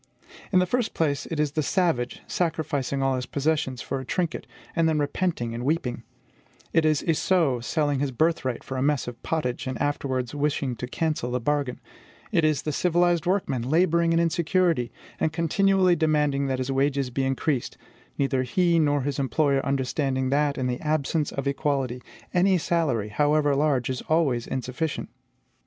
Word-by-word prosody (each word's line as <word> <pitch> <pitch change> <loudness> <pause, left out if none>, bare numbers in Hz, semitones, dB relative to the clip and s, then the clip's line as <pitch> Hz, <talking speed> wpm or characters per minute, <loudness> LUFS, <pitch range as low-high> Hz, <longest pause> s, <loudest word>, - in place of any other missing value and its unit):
In 190 - +4
the 180 - +4
first 240 +5 -1
place, 145 -4 0
it 160 - -4
is 150 -2 +1
the 155 - 0
savage 155 -7 0
sacrificing 150 -5 -1
all 135 0 +2
his 125 -1 -4
possessions 145 -3 -1
for 135 - -3
a - - -6
trinket, 170 +5 -2 0.3
and 165 -1 +3
then 155 - +1
repenting 145 -4 -1
and 120 +1 -4
weeping; 135 -4 -1 0.7
it 165 -1 +3
is 155 -2 +2
Esau 165 -5 +2
selling 145 +2 0
his 140 0 0
birthright 130 -2 0
for 130 - -5
a - - -1
mess 145 -1 +1
of 120 -1 -7
pottage, 130 -6 -2
and 130 -2 -3
afterwards 130 -4 -1
wishing 145 -3 -1
to 125 - -5
cancel 155 -3 -1
the 125 0 -1
bargain; 140 0 -1 0.5
it 165 - +2
is 155 -3 +2
the 155 - -1
civilized 175 +1 +2
workman 180 -10 0
laboring 165 +5 +2
in 165 - +3
insecurity, 170 - +1 0.3
and 160 - 0
continually 185 +2 +3
demanding 150 -3 +1
that 130 -1 0
his 130 +1 -2
wages 135 -1 +1
be 135 +2 -1
increased, 135 0 -1 0.4
neither 135 -2 +1
he 170 +6 +2
nor 145 -2 +2
his 140 0 -2
employer 140 +1 +1
understanding 130 -1 -1
that, 145 0 +1
in 130 - -1
the 125 -1 -2
absence 155 0 0
of 140 - -4
equality, 140 -3 -1 0.3
any 185 +1 +4
salary, 150 -11 0
however 145 +4 +2
large, 140 -4 +1
is 130 -1 -3
always 145 -7 +2
insufficient. 130 +4 -3
145 Hz, 170 wpm, -25 LUFS, 130-165 Hz, 0.7 s, In